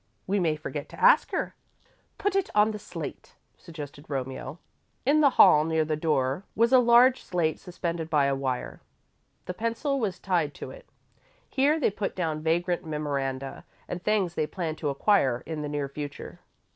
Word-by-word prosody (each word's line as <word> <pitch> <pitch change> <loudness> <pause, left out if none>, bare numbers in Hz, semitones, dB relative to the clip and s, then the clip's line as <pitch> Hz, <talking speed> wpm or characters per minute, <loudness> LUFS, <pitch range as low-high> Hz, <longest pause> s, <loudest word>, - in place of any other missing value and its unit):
We 200 +2 0
may 165 -4 +1
forget 150 -1 -6
to - - -12
ask - - +5
her." - - -2 0.6
"Put 405 -1 -1
it 390 -2 +1
on 210 +1 +5
the 210 - -6
slate," - - -8 0.2
suggested 150 -3 -10
Romeo. 135 +2 -4 0.5
In 295 +3 +4
the 285 - +6
hall, 150 0 +8
near 160 0 +1
the 155 0 -1
door, 150 0 0
was 230 +3 +3
a 260 - +8
large 245 +2 +5
slate 165 -4 -1
suspended 170 -2 -4
by 150 -3 +3
a 140 - +2
wire. 130 -2 -3 0.6
The 180 - -4
pencil 230 +7 -1
was 200 -7 -2
tied 170 -6 -1
to - - -7
it. - - -13 0.6
Here 290 +4 +2
they 260 - +2
put 200 0 -4
down 160 -4 -2
vagrant 175 +3 0
memoranda 140 -4 -3 0.2
and 175 - -5
things 200 -4 +1
they 155 -3 -1
planned 160 -4 -4
to 150 - -1
acquire 135 - +2
in 160 -2 -4
the 150 - -4
near 145 -1 -2
future. 145 +4 -7
165 Hz, 175 wpm, -27 LUFS, 150-210 Hz, 0.6 s, hall